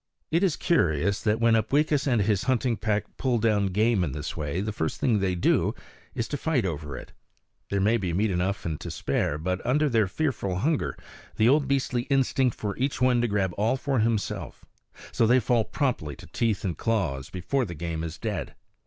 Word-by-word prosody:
It 165 Hz, +2 st, +3 dB
is 185 Hz, -6 st, +2 dB
curious 100 Hz, -, +1 dB
that 110 Hz, 0 st, +1 dB
when 115 Hz, 0 st, +4 dB
Upweekis 145 Hz, +6 st, +2 dB
and 120 Hz, -6 st, +3 dB
his 100 Hz, -2 st, +1 dB
hunting 125 Hz, -2 st, +1 dB
pack 105 Hz, -1 st, -1 dB
pull 125 Hz, -3 st, +1 dB
down 105 Hz, -3 st, +2 dB
game 105 Hz, +1 st, +2 dB
in 75 Hz, -6 st, -2 dB
this 75 Hz, +2 st, -5 dB
way 75 Hz, +2 st, -3 dB
the 105 Hz, +3 st, -2 dB
first 80 Hz, -7 st, -3 dB
thing 115 Hz, -5 st, +2 dB
they 95 Hz, -2 st, 0 dB
do 85 Hz, -, +2 dB, 0.4 s
is 115 Hz, -, -2 dB
to 145 Hz, -, -2 dB
fight 140 Hz, -8 st, 0 dB
over 75 Hz, -5 st, -4 dB
it. -, -, -10 dB, 0.6 s
There 100 Hz, -, 0 dB
may 110 Hz, +4 st, +3 dB
be 95 Hz, -5 st, -2 dB
meat 100 Hz, +5 st, +1 dB
enough 95 Hz, +3 st, -1 dB
and 80 Hz, -2 st, -3 dB
to -, -, -6 dB
spare, 70 Hz, -, -1 dB
but 90 Hz, +4 st, -2 dB
under 150 Hz, +4 st, +2 dB
their 110 Hz, -5 st, +2 dB
fearful 110 Hz, -, -1 dB
hunger 150 Hz, -, 0 dB
is -, -, -20 dB, 0.3 s
the 110 Hz, +2 st, +4 dB
old 145 Hz, +1 st, +3 dB
beastly 130 Hz, -3 st, 0 dB
instinct 135 Hz, -2 st, +2 dB
for 100 Hz, -2 st, -3 dB
each 135 Hz, +2 st, -1 dB
one 125 Hz, -1 st, +3 dB
to 120 Hz, -, +1 dB
grab 100 Hz, -4 st, 0 dB
all 110 Hz, +5 st, +2 dB
for 135 Hz, -2 st, -1 dB
himself; 110 Hz, -2 st, -2 dB, 0.5 s
so 115 Hz, -, +2 dB
they 125 Hz, +3 st, +5 dB
fall 120 Hz, 0 st, +2 dB
promptly 120 Hz, -, -2 dB
to -, -, -13 dB
teeth 115 Hz, -1 st, -1 dB
and 85 Hz, -5 st, -3 dB
claws 85 Hz, -13 st, -1 dB
before 120 Hz, +9 st, -1 dB
the 85 Hz, -4 st, -7 dB
game 80 Hz, 0 st, -4 dB
is 80 Hz, 0 st, -5 dB
dead. -, -, -4 dB
110 Hz, 205 wpm, -26 LUFS, 90-125 Hz, 0.6 s, they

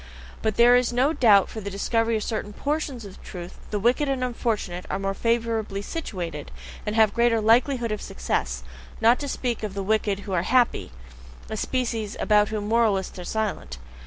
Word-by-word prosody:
But 220 Hz, -2 st, 0 dB
there 240 Hz, +1 st, +7 dB
is 250 Hz, -1 st, +2 dB
no 260 Hz, +6 st, +2 dB
doubt 210 Hz, -, +6 dB
that -, -, -14 dB
for 220 Hz, -, -6 dB
the 200 Hz, -, -4 dB
discovery 225 Hz, +3 st, 0 dB
of 215 Hz, -, -3 dB
certain 210 Hz, -2 st, -3 dB
PORTIONS 280 Hz, -3 st, -3 dB
of 195 Hz, -, -12 dB
truth 175 Hz, -1 st, -9 dB
the 210 Hz, -, -1 dB
wicked 245 Hz, +7 st, +2 dB
and 265 Hz, -2 st, 0 dB
unfortunate 220 Hz, -7 st, -2 dB
are -, -, -1 dB
more 195 Hz, 0 st, -2 dB
favourably 225 Hz, -3 st, -1 dB
situated 175 Hz, -, -5 dB, 0.4 s
and 210 Hz, -, -1 dB
have 220 Hz, -1 st, +5 dB
a -, -, -17 dB
greater 235 Hz, -1 st, +3 dB
likelihood 235 Hz, +2 st, +3 dB
of 215 Hz, -, -3 dB
success; -, -, -2 dB, 0.4 s
not 235 Hz, +2 st, +5 dB
to 285 Hz, -, -4 dB
speak 245 Hz, -3 st, -2 dB
of 210 Hz, -3 st, -4 dB
the 195 Hz, -, -2 dB
wicked 205 Hz, -1 st, 0 dB
who 200 Hz, -, -6 dB
are 175 Hz, -, +2 dB
happy 240 Hz, -, +2 dB, 0.6 s
a -, -, -2 dB
species 225 Hz, -3 st, -2 dB
about 210 Hz, -1 st, +3 dB
whom 210 Hz, -1 st, -3 dB
moralists 215 Hz, -5 st, +1 dB
are -, -, -5 dB
silent. 175 Hz, -, -3 dB
220 Hz, 190 wpm, -25 LUFS, 200-240 Hz, 0.6 s, there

